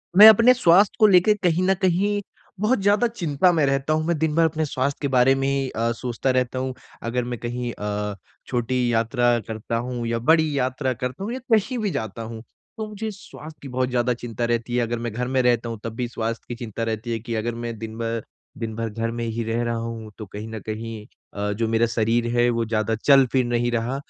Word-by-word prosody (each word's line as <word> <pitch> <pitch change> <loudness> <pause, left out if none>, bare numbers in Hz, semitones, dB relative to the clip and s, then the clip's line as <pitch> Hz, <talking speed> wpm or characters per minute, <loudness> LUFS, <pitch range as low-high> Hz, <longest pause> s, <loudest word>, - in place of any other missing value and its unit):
मैं 210 +3 +11
अपने 230 +4 +7
स्वास्थ्य 195 -4 +4
को 215 - +7
लेके 190 +2 +5
कहीं 175 +1 +2
न - - +6
कहीं 200 +3 +2 0.4
बहुत 215 +4 +2
ज़्यादा 205 +4 +3
चिंता 180 -7 +1
में 155 -4 +3
रहता 135 +2 +1
हूँ। 155 0 0
मैं 170 0 0
दिन 155 0 0
भर 165 0 +4
अपने 160 0 0
स्वास्थ्य 140 0 -1
के 140 - 0
बारे 130 0 +4
में 135 0 0
अ, 115 0 -1
सोचता 120 +2 -3
रहता 130 0 0
हूँ। 130 0 -2 0.3
अगर 120 +2 -1
मैं 120 -1 -5
कहीं 120 0 -3
अ, 105 0 -3 0.3
छोटी 125 0 0
यात्रा 120 +1 +2
करता 110 +1 -4
हूँ 120 0 -3
या 115 0 -1
बड़ी 155 +3 +3
यात्रा 130 0 0
करता 125 +7 -5
हूँ 225 +4 -3
या 260 - -4
कहीं 225 +4 +2
भी 210 -3 -1
जाता 110 - -4
हूँ 115 0 -7 0.3
तो 220 -1 -4
मुझे 215 +1 -5
स्वास्थ्य 160 -5 -12
की 140 - -8
बहुत 130 0 -1
ज़्यादा 125 0 +1
चिंता 120 -1 -4
रहती 120 +1 -1
है। 125 - +2
अगर 120 0 -2
मैं 120 0 -3
घर 125 +2 -2
में 130 0 +1
रहता 120 -1 +2
हूँ 115 - -5
तब 115 - -4
भी 125 0 -2
स्वास्थ्य 115 -1 -4
की 120 - -5
चिंता 115 -2 -5
रहती 115 +1 -3
है 115 - -1
कि 115 +1 -5
अगर 115 +1 -2
मैं 115 -1 -5
दिन 110 0 -7
भर 115 -1 -2 0.3
दिन 115 -2 -4
भर 115 0 -2
घर 115 +2 -3
में 120 0 -4
ही 115 +1 -2
रह 115 +1 -1
रहा 120 0 -1
हूँ 115 -1 -6
तो 110 - -7
कहीं 105 +3 -8
न 110 0 -6
कहीं 110 0 -5 0.3
अ, 105 0 -2
जो 115 +2 -1
मेरा 115 +1 +2
शरीर 115 +1 +1
है 120 0 +4
वो 115 -1 0
ज़्यादा 110 0 0
चल-फिर 130 +1 +4
नहीं 120 0 0
रहा 120 +2 -1
120 Hz, 230 wpm, -23 LUFS, 115-145 Hz, 0.4 s, मैं